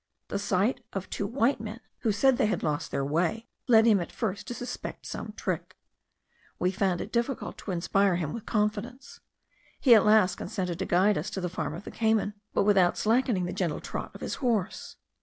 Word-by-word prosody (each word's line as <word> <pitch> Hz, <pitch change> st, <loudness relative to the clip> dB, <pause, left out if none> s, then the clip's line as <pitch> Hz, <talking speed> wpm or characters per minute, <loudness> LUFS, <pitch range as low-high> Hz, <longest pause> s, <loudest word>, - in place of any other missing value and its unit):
The 200 Hz, -, -2 dB
sight 200 Hz, +5 st, 0 dB
of 190 Hz, -1 st, -5 dB
two 200 Hz, -, -2 dB
white 240 Hz, +3 st, +1 dB
men, 220 Hz, +1 st, -6 dB, 0.2 s
who 225 Hz, -, +1 dB
said 260 Hz, +5 st, +3 dB
they -, -, +3 dB
had 215 Hz, -, -1 dB
lost 150 Hz, -1 st, -1 dB
their 135 Hz, -, -1 dB
way, 170 Hz, +10 st, 0 dB, 0.2 s
led 225 Hz, -3 st, +6 dB
him 215 Hz, -4 st, +5 dB
at 175 Hz, -, -5 dB
first 205 Hz, -4 st, -3 dB
to 245 Hz, -, -4 dB
suspect 245 Hz, -, -6 dB
some -, -, -5 dB
trick. -, -, -3 dB, 0.8 s
We 180 Hz, -, +1 dB
found 190 Hz, -3 st, 0 dB
it 210 Hz, -, -6 dB
difficult 240 Hz, +2 st, -1 dB
to -, -, -8 dB
inspire 185 Hz, +2 st, +2 dB
him 160 Hz, -4 st, -2 dB
with 230 Hz, -, -7 dB
confidence; 210 Hz, +4 st, -2 dB, 0.6 s
he 255 Hz, -, +6 dB
at 215 Hz, -, +7 dB
last 210 Hz, -4 st, +4 dB
consented 180 Hz, -2 st, -3 dB
to 190 Hz, -, -1 dB
guide 195 Hz, +3 st, +3 dB
us 210 Hz, -, -4 dB
to 205 Hz, -, -4 dB
the 180 Hz, -1 st, -2 dB
farm 155 Hz, -4 st, -3 dB
of 175 Hz, -, -8 dB
the -, -, -8 dB
Cayman, 220 Hz, -2 st, +1 dB, 0.2 s
but -, -, +2 dB
without 195 Hz, -3 st, +4 dB
slackening 225 Hz, -4 st, +2 dB
the 175 Hz, -, -4 dB
gentle 170 Hz, -5 st, -1 dB
trot -, -, -5 dB
of -, -, -10 dB
his -, -, -3 dB
horse. 230 Hz, -8 st, -1 dB
205 Hz, 205 wpm, -28 LUFS, 180-225 Hz, 0.8 s, at